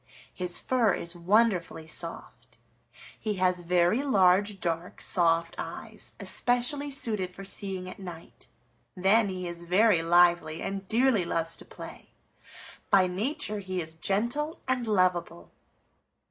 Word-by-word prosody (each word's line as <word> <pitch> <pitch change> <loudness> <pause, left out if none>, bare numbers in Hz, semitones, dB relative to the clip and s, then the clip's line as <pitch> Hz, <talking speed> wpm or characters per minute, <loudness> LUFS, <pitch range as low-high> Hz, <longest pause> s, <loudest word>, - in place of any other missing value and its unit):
His 180 -1 +2
fur 235 -7 +2
is 170 +1 -4
wonderfully 180 -2 +1
soft. 165 +1 -5 0.6
He 215 -2 -2
has 185 -1 +1
very 175 +6 +2
large, 200 -5 +3
dark, 170 +1 -3
soft 165 -1 +2
eyes, - - -6
especially 245 +4 +1
suited 215 -9 0
for 195 +2 -10
seeing 190 -1 -2
at 185 - -9
night. 175 -4 -10 0.5
Then, 200 +3 +3
he 185 -1 -5
is 170 0 -6
very 185 +1 +3
lively 170 -1 +3
and 195 0 -5
dearly 235 -2 +2
loves 165 -1 -2
to - - -12
play. - - -11 0.8
By 190 -2 +5
nature 210 +3 -3
he 185 -2 -4
is 160 -2 -5
gentle 235 - -1
and 255 -2 -1
lovable." 180 - 0
185 Hz, 130 wpm, -28 LUFS, 175-215 Hz, 0.8 s, By